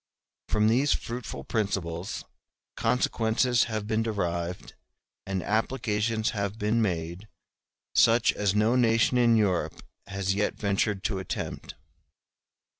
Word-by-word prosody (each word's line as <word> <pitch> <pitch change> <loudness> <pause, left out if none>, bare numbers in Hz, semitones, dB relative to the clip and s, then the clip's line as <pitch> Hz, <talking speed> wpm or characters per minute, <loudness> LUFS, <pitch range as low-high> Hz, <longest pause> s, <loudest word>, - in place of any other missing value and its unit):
From 105 0 +3
these 130 +6 +3
fruitful 120 +1 -5
principles 95 -3 -2 0.5
consequences 115 0 +2
have 110 -3 -3
been 110 +1 0
derived 90 -5 -3 0.5
and 95 -2 -2
applications 110 0 0
have 100 0 -3
been 110 +2 +1
made 85 0 -2 0.7
such 115 0 +5
as 100 -1 0
no 110 +3 +3
nation 120 0 +3
in 120 -1 +5
Europe 100 -5 0 0.2
has 95 -1 -1
yet 105 +1 0
ventured 100 -1 0
to 95 -3 -1
attempt. 95 - -5
105 Hz, 115 wpm, -27 LUFS, 95-115 Hz, 0.7 s, such